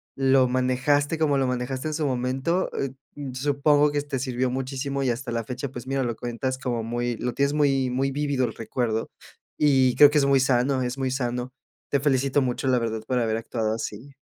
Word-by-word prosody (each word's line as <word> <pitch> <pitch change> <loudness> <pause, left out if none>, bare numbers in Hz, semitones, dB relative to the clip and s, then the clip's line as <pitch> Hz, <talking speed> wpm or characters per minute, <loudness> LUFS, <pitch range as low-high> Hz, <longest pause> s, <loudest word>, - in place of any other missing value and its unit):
lo 135 -1 +4
manejaste 130 +4 +1
como 150 -3 +2
lo 135 -1 +1
manejaste 130 +3 -2
en - - -4
su 150 0 -1
momento. 130 +8 0
Eh, 135 - -1 0.4
supongo 145 +2 +2
que 145 0 0
te 140 -2 -4
sirvió 125 0 -1
muchísimo 135 +2 -3
y 130 - +1
hasta 120 +1 -3
la 115 - -1
fecha, 125 +4 -5
pues, 120 -1 -8
mira, 135 0 -1
lo 120 -2 -2
cuentas 120 +3 -3
como 125 -3 -2
muy 120 +1 -2
lo 125 +1 -3
tienes 140 +2 +1
muy 135 -3 +2
muy 135 +2 0
vívido 140 -2 0
el 110 - -4
recuerdo, 115 0 -2 0.5
y 130 -4 +4
creo 145 -1 +9
que 150 - +2
es 140 - +2
muy 140 -1 +4
sano, 130 0 +2
es 125 +1 -2
muy 130 -1 -1
sano. 125 -1 -2 0.4
Te 140 - +2
felicito 140 0 +2
mucho, 130 +1 -1
la 125 -1 +3
verdad, 110 -1 -2
por 125 +1 0
haber 110 -2 0
actuado 110 -1 -2
así. 115 +4 -6
130 Hz, 205 wpm, -25 LUFS, 125-140 Hz, 0.5 s, creo